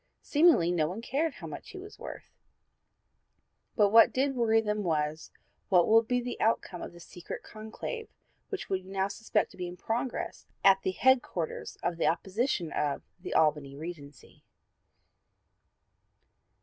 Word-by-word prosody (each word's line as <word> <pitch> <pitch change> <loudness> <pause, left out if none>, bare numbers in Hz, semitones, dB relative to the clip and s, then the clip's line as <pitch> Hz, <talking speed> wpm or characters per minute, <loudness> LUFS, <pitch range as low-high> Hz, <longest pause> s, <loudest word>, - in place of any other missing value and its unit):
Seemingly 295 - +4
no 160 -3 +2
one 185 +6 -5
cared 280 +6 -1
how - - -9
much - - -8
he - - -9
was 405 +3 -11
worth; - - -9 1.4
but 205 -2 +4
what 225 +1 +8
did 270 +1 0
worry 225 -2 +3
them 210 -1 -1
was, 155 -3 -1 0.4
what 180 -3 +5
will 225 +1 +7
be 245 +2 0
the 245 0 -5
outcome 200 -5 0
of - - -6
this 175 -1 -13
secret 175 - -8
conclave 220 - -7 0.4
which 400 - -4
we 190 -1 -1
now 190 +1 -1
suspect 205 +3 -1
to - - -16
be 180 -1 -3
in 175 +1 -8
progress 235 +6 -3 0.2
at 195 0 +6
the - - -1
headquarters 245 -10 +1
of 175 -1 -1
the - - +1
opposition 185 - 0
of 145 -2 -1 0.2
the 180 - -6
'Albany 150 -3 +2
Regency.' 150 -3 -10
195 Hz, 150 wpm, -30 LUFS, 170-240 Hz, 1.4 s, what